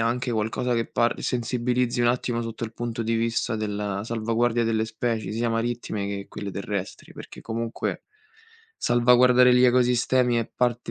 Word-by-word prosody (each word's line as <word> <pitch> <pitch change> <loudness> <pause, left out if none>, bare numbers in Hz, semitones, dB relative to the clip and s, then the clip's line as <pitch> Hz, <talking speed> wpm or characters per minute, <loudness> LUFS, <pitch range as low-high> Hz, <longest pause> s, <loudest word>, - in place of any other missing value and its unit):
anche 120 +2 0
qualcosa 115 +3 -1
che 115 -1 0
parli 120 0 0
sensibilizzi 125 0 0
un 120 - +4
attimo 120 -1 -1
sotto 115 0 -5
il 110 - -7
punto 120 0 -3
di 115 +1 -1
vista 115 +1 0
della 105 -2 -3
salvaguardia 115 +1 0
delle 110 -1 +1
specie, 110 -1 -3
sia 115 +2 -1
marittime 115 -3 -2
che 100 0 -5
quelle 100 -1 -6
terrestri, 100 0 -5
perché - - -10
comunque 115 0 -4 0.7
salvaguardare 125 +1 +5
gli 125 0 +5
ecosistemi 125 0 +3
è 115 -2 0
parte 120 -1 -1
115 Hz, 155 wpm, -25 LUFS, 110-120 Hz, 0.7 s, salvaguardare